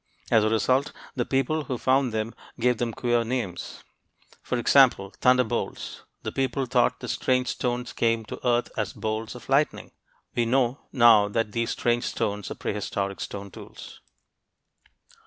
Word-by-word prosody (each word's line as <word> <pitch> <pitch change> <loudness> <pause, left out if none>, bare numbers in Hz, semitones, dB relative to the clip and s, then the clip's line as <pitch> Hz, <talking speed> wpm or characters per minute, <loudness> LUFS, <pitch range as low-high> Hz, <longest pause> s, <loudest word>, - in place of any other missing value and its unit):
As 110 -2 +5
a 110 - +2
result, 130 +5 +1 0.2
the 120 -3 -1
people 140 +3 0
who 125 -1 -3
found 130 0 +2
them 110 +1 -2 0.3
gave 125 0 +2
them 120 -1 -1
queer 120 0 +1
names; 115 -7 -4 0.6
for 125 - -2
example, 120 -5 +4
"thunderbolts." 125 -3 +1 0.2
The - - -3
people 135 0 -1
thought 120 - +1
the - - -5
strange 125 0 +1
stones 125 0 -2
came 115 -1 +1
to - - -7
earth 120 -1 +1
as 105 -3 -2
bolts 110 +1 -3
of 125 - -11
lightning. 140 +3 +1 0.4
We 120 -1 +1
know 130 +2 +2
now 115 -5 +6
that 110 +1 -1
these 115 +1 -1
strange 120 0 0
stones 105 -3 -2
were - - -5
prehistoric 100 -1 -3
stone 100 -1 -6
tools. - - -11
120 Hz, 155 wpm, -26 LUFS, 110-125 Hz, 0.6 s, now